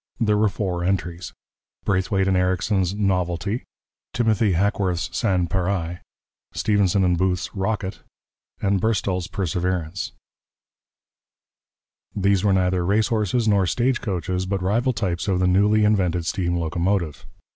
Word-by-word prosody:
There 105 -3 +2
were 105 0 +3
four 90 -3 -3
entries: 90 -2 -2 0.5
Braithwaite 95 0 +1
and 95 - +2
Ericsson's 95 +1 +1
Novelty. 95 +1 -1 0.5
Timothy 110 -4 +2
Hackworth's 95 -1 0
Sans 95 -4 +1
pareil. 90 -2 -1 0.5
Stephenson 100 -2 +2
and 90 -2 +2
Booth's 90 -1 0
Rocket. 95 -1 -2 0.6
Burstall's 95 -2 0
Perseverance. 90 -1 -2 2.0
These 100 -1 +2
were 105 - +3
neither 90 -1 +2
race 100 +4 +2
horses 110 +1 0
nor 100 -3 +3
stagecoaches, 95 -7 -1
but 95 -1 -2
rival 120 +7 +1
types 90 -6 -2
of 95 -2 +1
the 90 - +2
newly 105 +4 +3
invented 90 -5 +1
steam 85 -1 -1
locomotive. 85 -2 -1
95 Hz, 115 wpm, -23 LUFS, 90-100 Hz, 2.0 s, were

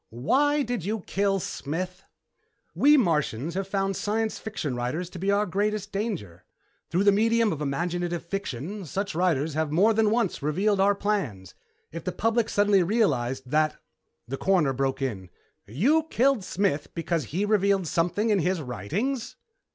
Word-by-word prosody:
"Why 285 - +2
did 245 -7 -3
you 210 +3 -2
kill 195 +1 0
Smith?" 180 +4 -5 0.7
"We 295 +1 +5
Martians 160 - 0
have 190 +1 -3
found 195 0 -1
science 220 +3 -1
fiction 155 - -4
writers 130 +9 -3
to 180 - -8
be 195 +3 -1
our 200 +1 +3
greatest 205 +2 -1
danger. 175 - -4 0.5
Through 180 +4 +1
the 200 - +6
medium 225 0 +2
of 150 - -6
imaginative 175 +4 -2
fiction, 195 - -4
such 195 +7 -3
writers 160 -3 +1
have 155 0 -1
more 200 +8 +4
than 220 -1 +3
once 225 -7 0
revealed 190 +8 +1
our 200 +1 +4
plans. 170 - -2 0.4
If 165 0 -7
the 185 - -2
public 225 +3 0
suddenly 205 -1 +3
realized 135 - 0
that 155 0 +2 0.3
" - - -51
The 135 +3 -4
Coroner 175 -7 +2
broke 135 +1 -1
in. 95 -9 -4 0.4
"You 275 - +2
killed 260 -3 +2
Smith 185 -6 -1
because 165 -2 -1
he 190 +7 -1
revealed 200 -2 +2
something 175 +7 0
in 205 - +3
his 180 +1 0
writings?" 170 - -3
185 Hz, 160 wpm, -26 LUFS, 150-210 Hz, 0.7 s, the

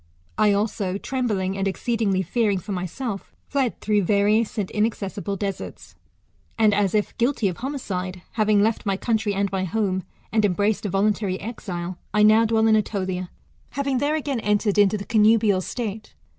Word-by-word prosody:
I 210 - +4
also, 200 -2 -1
trembling, 205 -6 -1
and 195 0 -1
exceedingly 200 -2 0
fearing 205 +2 +1
for 185 +3 -6
my 185 -1 -2
self, 225 0 -6
fled 270 -4 -1
through 210 -1 +2
vadous 210 +4 +2
and 200 -3 -2
inaccessible 205 -2 -2
deserts; 195 0 -5 0.6
and, 215 -2 +4
as 205 -1 +1
if 210 - 0
guilty 240 -3 +2
of 180 - -6
homicide, 190 -9 -4
having 215 -2 +3
left 220 +1 0
my 195 -2 0
country 220 -2 0
and 200 -1 0
my 190 -1 -1
home, 190 0 0 0.3
and 220 -1 +2
embraced 205 +2 +1
a - - -3
voluntary 195 0 0
exile, 185 -5 -5 0.2
I 210 - +5
now 215 +2 +6
dwell 220 0 +2
in 220 -1 +5
Etolia. 185 -4 -1 0.4
having 275 -1 -1
there 290 +3 +1
again 285 -5 -2
entered 210 -1 +1
into 205 +1 +4
the 200 - -7
connubial 215 -3 +4
state. 215 +1 -5
210 Hz, 170 wpm, -23 LUFS, 195-225 Hz, 0.6 s, now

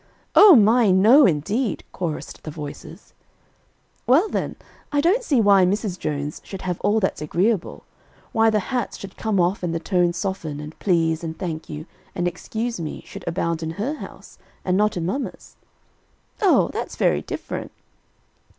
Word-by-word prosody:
"O 410 -5 +9
my! 225 0 +5
no 220 +10 +6
indeed," 195 - -1
chorused 170 -4 -5
the - - -7
voices. 150 -1 -9 0.9
"Well, 305 - +5
then, - - -2 0.4
I 290 - +1
don't 360 +11 +3
see 290 - +1
why 200 -3 +5
Mrs. 190 0 -1
Jones 145 0 -3
should 195 - -8
have 180 -2 -3
all 210 +2 +2
that's 190 -6 -1
agreeable; 180 +5 -1 0.5
why 225 0 +4
the 215 -1 +1
hats 245 -3 -2
should 195 -1 -10
come 215 -3 -1
off 180 +3 +1
and 170 -2 -2
the - - -1
tones 175 0 +1
soften, 170 -6 -4
and 150 +1 -8
'please,' 165 -3 +1
and 160 -1 -5
'thank 165 -4 -5
you,' 150 +1 -6 0.3
and 175 0 0
'excuse 225 +5 -4
me,' 160 -2 -6
should - - -10
abound 170 -1 -1
in 160 - -3
her 240 +9 -1
house, 310 - -11 0.3
and 180 - +1
not 210 0 +2
in 165 - -2
mamma's." 235 +11 -5 0.9
"Oh! 395 -4 +4
that's - - -4
very - - +2
different." - - -6
190 Hz, 165 wpm, -22 LUFS, 165-225 Hz, 0.9 s, O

